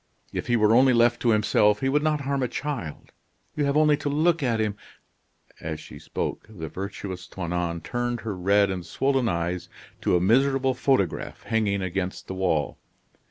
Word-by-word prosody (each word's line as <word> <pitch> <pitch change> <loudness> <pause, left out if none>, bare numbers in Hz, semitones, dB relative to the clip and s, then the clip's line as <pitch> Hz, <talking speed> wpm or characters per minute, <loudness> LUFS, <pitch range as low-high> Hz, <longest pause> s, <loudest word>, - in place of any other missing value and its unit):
If - - -3
he 120 - +2
were 110 -1 +4
only 130 +2 +6
left 120 0 +3
to 120 - +2
himself 105 -1 +3
he 135 - +1
would 145 +2 +2
not 150 -1 +1
harm 140 0 -1
a 125 - +1
child. 130 - -5 0.4
You 150 - +1
have 140 +1 +1
only 150 -1 +5
to 145 0 -3
look 160 +3 +2
at 120 -4 +1
him 105 -2 0 0.5
" - - -30
As 80 -1 -4
she - - -11
spoke, - - -4
the 85 -7 -7
virtuous 95 -1 -6
Toinon 85 -2 -3
turned 120 -1 -2
her 110 -3 -4
red 100 +2 +3
and 90 -2 -4
swollen 135 +7 0
eyes 85 +1 -2 0.3
to - - +2
a - - +4
miserable 135 +7 +3
photograph 125 - 0
hanging 105 -4 0
against 95 0 -3
the - - -6
wall. 90 -6 0
110 Hz, 185 wpm, -25 LUFS, 95-135 Hz, 0.5 s, only